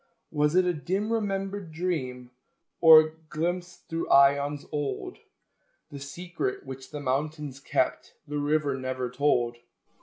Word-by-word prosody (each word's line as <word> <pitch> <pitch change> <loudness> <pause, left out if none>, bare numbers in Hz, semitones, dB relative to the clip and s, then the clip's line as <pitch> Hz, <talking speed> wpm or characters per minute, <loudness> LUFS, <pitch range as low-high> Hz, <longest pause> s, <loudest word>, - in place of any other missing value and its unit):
Was 150 +2 +1
it 185 0 +5
a 180 - +2
dim 190 +8 -2
remembered 195 -4 -2
dream? 130 -8 -3 0.5
Or 155 -1 +8
glimpse 175 +2 -2
through 165 0 -3
aeons 140 +1 +4
old? 145 -2 -3 0.7
The 140 - -7
secret 160 0 -4
which 130 0 -8
the 150 - -6
mountains 145 +1 -2
kept 140 - -1
The 150 0 -3
river 145 -1 +1
never 130 -2 -3
told. 125 -3 +1
150 Hz, 125 wpm, -27 LUFS, 135-170 Hz, 0.7 s, Or